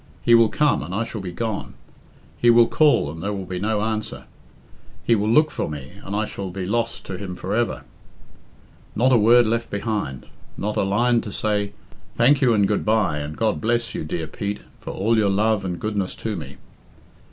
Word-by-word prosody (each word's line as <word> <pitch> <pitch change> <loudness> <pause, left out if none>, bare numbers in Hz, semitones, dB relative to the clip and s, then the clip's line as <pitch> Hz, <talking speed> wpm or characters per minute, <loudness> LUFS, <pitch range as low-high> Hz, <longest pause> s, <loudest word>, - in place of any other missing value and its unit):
He 120 - +4
will 115 -1 +6
come, 150 +7 +2
and 90 +6 -5
I 110 - 0
shall 115 -2 -6
be 90 -2 -5
gone. 110 +2 -4 0.6
He 120 - +3
will 120 0 +7
call, 145 - +3
and 80 +1 -9
there 100 +4 -2
will 95 -2 -5
be 90 0 -4
no 105 +1 0
answer. 110 -1 -3 0.8
He 115 - +3
will 105 -1 +1
look 150 +7 +4
for - - -3
me, 70 -2 -7
and 100 - -5
I 110 +1 0
shall 100 -2 -6
be 95 0 -5
lost 115 +4 -2
to 95 -2 -6
him 95 -3 -6
for 95 +2 -4
ever. 110 - -1 1.1
Not 125 +4 +3
a - - +6
word 120 +2 +6
left 115 +1 -1
behind. 100 - -3 0.3
Not 105 +1 -2
a - - +1
line 115 +5 +2
to 105 - -7
say, 105 -1 -1 0.4
'Thank 135 +4 +5
you 125 -3 +4
and 100 -3 +3
good 105 - 0
bye 105 -8 +1
and 75 +1 -6
God 110 -1 0
bless 115 +1 0
you, - - -4
dear 80 +1 -3
Pete, 100 +6 -5 0.2
for - - -9
all 110 +4 +1
your 105 -2 +3
love 105 +1 +1
and 90 -3 -4
goodness 100 -1 -2
to 110 -2 -4
rae."' - - -8
105 Hz, 210 wpm, -22 LUFS, 95-115 Hz, 1.1 s, will